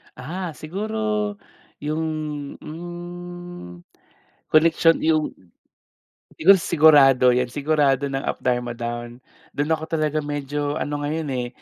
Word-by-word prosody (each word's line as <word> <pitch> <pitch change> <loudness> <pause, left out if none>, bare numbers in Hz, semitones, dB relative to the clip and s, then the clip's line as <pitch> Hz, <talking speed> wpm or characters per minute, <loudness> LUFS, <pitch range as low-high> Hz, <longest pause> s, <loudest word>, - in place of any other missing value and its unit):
Ah, 165 +6 -5
siguro 210 +4 -2 0.5
yung, 155 +2 -1 0.6
hmm, 175 - -9 0.7
koneksyon 165 +1 +4
yung 155 -1 +2 1.1
siguro, 195 +5 +7
Sigurado 145 -6 +5
yan. 125 0 +1
Sigurado 145 -2 +1
ng 135 0 -3
Up - - -2
Dharma 125 -1 0
Down. 120 +1 -5 0.3
Dun 145 +3 -1
ako 160 0 -1
talaga 155 -1 0
medyo 145 0 -3
ano 145 0 -3
ngayon 155 +1 -2
eh, 125 -1 -2
155 Hz, 110 wpm, -23 LUFS, 135-170 Hz, 1.1 s, siguro